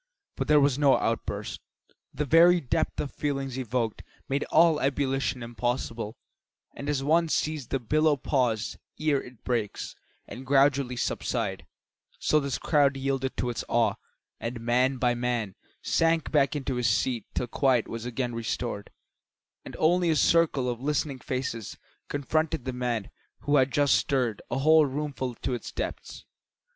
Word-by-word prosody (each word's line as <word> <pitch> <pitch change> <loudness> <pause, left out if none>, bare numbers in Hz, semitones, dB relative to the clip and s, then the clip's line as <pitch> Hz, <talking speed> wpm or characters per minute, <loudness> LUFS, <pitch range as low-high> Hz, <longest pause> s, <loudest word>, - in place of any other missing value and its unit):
But - - -3
there 150 0 +6
was 140 -1 +2
no 140 -2 +5
outburst. - - -3 0.5
The 150 - -2
very 170 +4 +6
depth 140 - -1
of 145 - -2
the - - -31
feelings 135 -3 -2
evoked 120 -3 -2 0.3
made 140 +1 0
all 160 -1 +4
ebullition 135 -2 0
impossible, 115 -1 -3 0.6
and 140 - -5
as 140 -2 0
one 165 +3 +3
sees 155 -5 -1
the 135 - -1
billow 150 +5 +2
pause 125 -6 -1 0.2
ere 150 -3 +1
it 125 -3 -14
breaks, 115 -5 -2 0.3
and 125 - -8
gradually 135 -1 +3
subside, 120 - -2 0.5
so 155 - +2
this 140 -3 -2
crowd 140 -3 +2
yielded 135 -1 -2
to 125 - -1
its 120 - -4
awe, - - +3 0.5
and 115 +1 -4
man 125 +3 +2
by 125 -1 +2
man 120 -4 -2 0.3
sank 165 -1 +1
back 145 -1 +3
into 135 -3 -2
his 120 -2 +2
seat 115 +2 0
till - - 0
quiet 125 -1 +1
was 115 -1 -6
again 125 0 -3
restored, 115 -2 -3 0.7
and - - -9
only 175 +2 +3
a 160 - +3
circle 150 -4 +3
of 120 -1 -3
listening 145 -1 -1
faces 125 -5 -4 0.3
confronted 145 -1 -1
the 130 - -3
man 120 -4 -2 0.3
who 145 0 +2
had 130 0 +4
just 145 0 +3
stirred 125 -6 +1
a - - -1
whole 155 +2 +5
roomful 135 -3 -3
to 130 - -3
its 120 - -5
depths. - - -6
135 Hz, 155 wpm, -27 LUFS, 120-145 Hz, 0.7 s, there